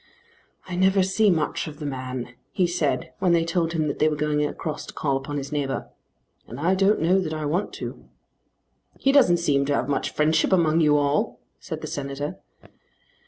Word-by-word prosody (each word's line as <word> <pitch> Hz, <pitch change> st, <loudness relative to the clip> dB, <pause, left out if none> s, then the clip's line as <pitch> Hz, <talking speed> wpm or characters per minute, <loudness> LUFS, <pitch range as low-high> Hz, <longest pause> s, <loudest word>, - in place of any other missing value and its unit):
"I 180 Hz, -, -4 dB
never 190 Hz, +1 st, +3 dB
see 200 Hz, +3 st, +3 dB
much 160 Hz, -4 st, 0 dB
of 150 Hz, -1 st, -8 dB
the 150 Hz, -, -6 dB
man," 130 Hz, -2 st, -5 dB, 0.2 s
he 185 Hz, -, +2 dB
said 175 Hz, +1 st, -1 dB
when 180 Hz, -2 st, +3 dB
they 165 Hz, -1 st, +3 dB
told 170 Hz, -1 st, 0 dB
him 155 Hz, -2 st, 0 dB
that 145 Hz, -, -3 dB
they 155 Hz, -, +4 dB
were 150 Hz, -, -1 dB
going 150 Hz, 0 st, 0 dB
across 150 Hz, +1 st, -4 dB
to -, -, -10 dB
call 140 Hz, -3 st, 0 dB
upon 135 Hz, +2 st, -4 dB
his 140 Hz, +1 st, -5 dB
neighbour, 140 Hz, -3 st, -2 dB, 0.6 s
"and 120 Hz, -, -8 dB
I 170 Hz, +5 st, +2 dB
don't 195 Hz, -1 st, +3 dB
know 185 Hz, +4 st, +4 dB
that 160 Hz, -4 st, -2 dB
I 155 Hz, -1 st, -3 dB
want 170 Hz, +8 st, -1 dB
to." -, -, -7 dB, 0.9 s
"He 270 Hz, -, +2 dB
doesn't 250 Hz, -12 st, +5 dB
seem 145 Hz, -5 st, +2 dB
to 145 Hz, -, +2 dB
have 125 Hz, -, -1 dB
much 145 Hz, -, 0 dB
friendship 155 Hz, +3 st, +2 dB
among 165 Hz, -3 st, +3 dB
you 150 Hz, -1 st, +4 dB
all," 145 Hz, 0 st, 0 dB, 0.2 s
said -, -, -6 dB
the -, -, -5 dB
Senator. 140 Hz, +1 st, -4 dB
155 Hz, 200 wpm, -24 LUFS, 145-175 Hz, 0.9 s, doesn't